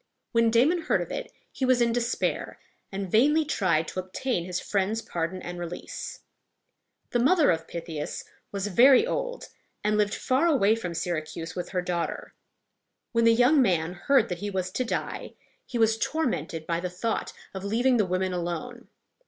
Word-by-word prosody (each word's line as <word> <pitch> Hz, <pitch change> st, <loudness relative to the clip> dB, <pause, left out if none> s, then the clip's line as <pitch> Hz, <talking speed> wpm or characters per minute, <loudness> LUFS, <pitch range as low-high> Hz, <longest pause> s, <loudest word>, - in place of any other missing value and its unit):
When 230 Hz, -1 st, +4 dB
Damon 270 Hz, +10 st, +3 dB
heard -, -, +1 dB
of -, -, -10 dB
it, -, -, -5 dB, 0.2 s
he -, -, -5 dB
was 255 Hz, -1 st, +4 dB
in 235 Hz, -1 st, +3 dB
despair, 240 Hz, 0 st, -1 dB, 0.3 s
and 195 Hz, -2 st, -4 dB
vainly 295 Hz, +8 st, +4 dB
tried 170 Hz, -, +1 dB
to -, -, -4 dB
obtain 185 Hz, +1 st, -2 dB
his 180 Hz, -1 st, -2 dB
friend's 205 Hz, +2 st, 0 dB
pardon 175 Hz, -3 st, -4 dB
and 175 Hz, 0 st, -6 dB
release. 175 Hz, 0 st, -6 dB, 0.9 s
The 240 Hz, -, +2 dB
mother 295 Hz, -, +5 dB
of 165 Hz, -1 st, -2 dB
Pythias 165 Hz, -3 st, -5 dB, 0.3 s
was 200 Hz, -1 st, -3 dB
very 250 Hz, -, +6 dB
old, -, -, -3 dB, 0.3 s
and 210 Hz, 0 st, +2 dB
lived 205 Hz, -1 st, +2 dB
far 265 Hz, +6 st, +1 dB
away 235 Hz, -10 st, +4 dB
from 180 Hz, -7 st, -4 dB
Syracuse 165 Hz, -1 st, -3 dB
with 180 Hz, -, -4 dB
her 180 Hz, -1 st, -1 dB
daughter. 175 Hz, -1 st, -3 dB, 0.8 s
When 230 Hz, -1 st, +2 dB
the 230 Hz, -, +7 dB
young 255 Hz, +5 st, +5 dB
man 175 Hz, -6 st, +1 dB
heard 235 Hz, +5 st, +3 dB
that 180 Hz, -2 st, -3 dB
he 205 Hz, -, -3 dB
was 185 Hz, -2 st, -2 dB
to 255 Hz, -, -1 dB
die, 235 Hz, -, -4 dB, 0.3 s
he 245 Hz, -, -3 dB
was 225 Hz, -1 st, +3 dB
tormented 170 Hz, -, -1 dB
by 170 Hz, 0 st, -1 dB
the 180 Hz, +1 st, -3 dB
thought 205 Hz, +6 st, -2 dB, 0.2 s
of 190 Hz, -1 st, -6 dB
leaving 240 Hz, +5 st, +2 dB
the 210 Hz, -4 st, +2 dB
women 185 Hz, +1 st, 0 dB
alone. 180 Hz, +8 st, -4 dB
205 Hz, 175 wpm, -27 LUFS, 175-245 Hz, 0.9 s, the